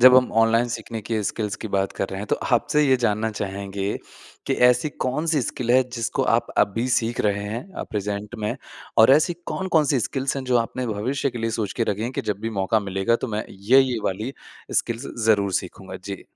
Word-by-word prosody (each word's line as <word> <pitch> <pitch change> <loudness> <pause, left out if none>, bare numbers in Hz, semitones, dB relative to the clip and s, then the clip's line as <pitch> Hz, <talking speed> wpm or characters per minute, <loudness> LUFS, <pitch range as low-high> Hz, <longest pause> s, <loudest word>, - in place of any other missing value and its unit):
जब 130 +1 +9
हम 125 -1 +4
ऑनलाइन 115 +2 +3
सीखने 115 -1 -5
की 110 +1 -1
स्किल्स 105 0 -2
की - - -3
बात 95 0 0
कर 95 - -2
रहे 95 - -5
हैं, 105 - -5
तो - - +1 0.2
आपसे 150 +5 +1
ये 130 -1 +5
जानना 110 +2 0
चाहेंगे, 100 -1 -3 0.5
कि - - +1
ऐसी 125 +5 +3
कौन-सी 150 +4 +1
स्किल 120 0 -3
है 130 +1 +6
जिसको 115 -2 -1
आप - - -1
अभी 115 +5 +2
सीख 120 -1 +1
रहे 105 -1 +1
हैं 115 - -5
अ, - - -4
प्रेज़ेंट 105 0 -3
में? 105 0 -2 0.4
और 110 +3 +8
ऐसी 155 +5 +4
कौन-कौन 170 -5 +1
सी 135 - +2
स्किल्स 135 +7 -1
हैं, 135 - -3
जो 125 -1 +2
आपने 125 +2 -2
भविष्य 120 +6 -1
के 120 - -6
लिए 115 0 -1
सोच 105 -3 -1
के - - +4
रखी 105 +2 -5
हैं 120 +3 -2
कि - - -2
जब 100 - -3
भी 115 - -3
मौका 110 +3 +2
मिलेगा 95 +3 +1
तो - - -3
मैं 110 - -2
ये-ये 125 +5 +3
वाली 110 +7 -2 0.5
स्किल्स 115 +3 -5 0.2
ज़रूर 100 -3 +3
सीखूँगा? - - -9
जी। - - -7
115 Hz, 215 wpm, -23 LUFS, 105-130 Hz, 0.5 s, जब